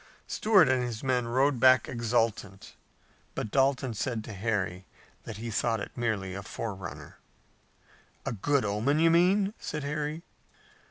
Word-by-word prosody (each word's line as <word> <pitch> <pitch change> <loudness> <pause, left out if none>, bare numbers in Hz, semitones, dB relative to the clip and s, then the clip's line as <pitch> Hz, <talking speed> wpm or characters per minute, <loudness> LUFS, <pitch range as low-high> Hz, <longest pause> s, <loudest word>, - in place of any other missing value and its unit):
Stuart 205 -7 +4
and 130 -1 +2
his 120 -1 -4
men 125 -2 0
rode 130 +2 +2
back 130 -1 +5
exultant, 115 -4 -2 0.6
but 105 - -4
Dalton 135 -2 +2
said 110 0 -3
to 110 - -8
Harry 95 -3 -2 0.4
that 110 - -7
he 115 +1 -5
thought 115 +1 0
it - - -6
merely 110 -6 -2
a 100 - -5
forerunner. 95 -3 -7 1.1
"A - - -1
good 130 +4 0
omen, 110 +8 +1
you 165 +1 +4
mean?" 195 +4 +3
said 150 -2 -5
Harry. 150 +3 -3
120 Hz, 145 wpm, -28 LUFS, 105-140 Hz, 1.1 s, back